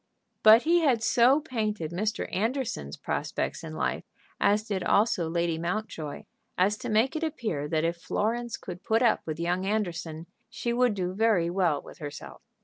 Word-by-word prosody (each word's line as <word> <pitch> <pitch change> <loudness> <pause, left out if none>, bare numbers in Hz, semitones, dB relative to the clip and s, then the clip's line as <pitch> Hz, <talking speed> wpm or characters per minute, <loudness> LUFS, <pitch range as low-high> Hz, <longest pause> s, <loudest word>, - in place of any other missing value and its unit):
But 220 +2 +8
he 340 +2 +4 0.2
so 240 +5 +4
painted 215 - -3
Mr. 210 +5 -2
Anderson's 220 - -2
prospects - - -3
in - - -7
life, - - -1 0.4
as 205 +1 +3
did 200 -4 -3
also 195 -6 +2
Lady 170 -1 0
Mountjoy, 170 -4 -4 0.3
as 195 +3 +3
to - - -5
make 225 +7 +2
it 315 - -2
appear 215 - -2
that 155 +1 0
if 170 +1 -1
Florence 230 +6 -2
could 180 -1 -8
put 225 +3 +2
up 230 - +3
with 155 0 -4
young 175 +2 0
Anderson 175 -6 -2 0.2
she 235 0 -3
would 245 -3 +2
do 185 -1 -2
very 200 -5 +2
well 175 -6 +1
with - - -13
herself. 145 -2 -8
205 Hz, 165 wpm, -28 LUFS, 170-230 Hz, 0.4 s, But